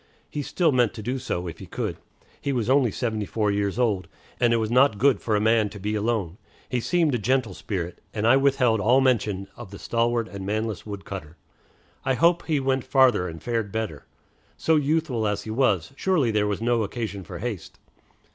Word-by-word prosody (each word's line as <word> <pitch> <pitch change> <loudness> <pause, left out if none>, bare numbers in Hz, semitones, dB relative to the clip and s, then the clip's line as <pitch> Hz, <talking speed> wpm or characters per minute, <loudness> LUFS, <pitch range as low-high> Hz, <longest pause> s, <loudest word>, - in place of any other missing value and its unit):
He 145 - -3
still 165 +3 +1
meant 125 -4 +2
to 110 - -7
do 130 +4 -2
so, 90 -8 -3
if 85 - -7
he - - -9
could. - - -3 0.5
He 140 - -1
was 125 -2 0
only 135 -3 +4
seventy 110 -1 -2
four 105 -2 0
years 100 0 -1
old, 105 -8 +1 0.3
and 120 -1 +3
it - - +4
was 110 -1 -1
not 125 -3 +4
good 130 0 +3
for 110 - 0
a - - +3
man 110 0 +3
to 100 - -10
be 105 +2 -2
alone. 105 -4 -1 0.3
He 125 - -1
seemed 165 +3 +1
a 120 - +1
gentle 120 -1 +1
spirit, 90 -3 -5
and 105 0 -2
I 120 +3 +6
withheld 135 -4 +3
all 120 +6 +4
mention 105 -7 +1
of - - -10
the 100 - -9
stalwart 115 +1 0
and 100 -2 -7
manless 110 +1 -3
wood 100 -2 -7
cutter. 85 -4 -8 0.7
I 130 - +1
hope 170 +4 +3
he 155 -3 +2
went 130 -1 0
farther, 130 -9 +3
and 80 -1 -8
fared 115 -4 -2
better. 110 -10 -4 0.5
So 160 - +2
youthful 145 -7 +1
as 105 0 -2
he 110 - -6
was, 110 -4 +1
surely 155 -9 +1
there 105 -1 +1
was 105 +2 -2
no 120 -1 +2
occasion 105 -2 -4
for 90 -1 -8
haste. 105 -3 -5
115 Hz, 210 wpm, -25 LUFS, 100-130 Hz, 0.7 s, I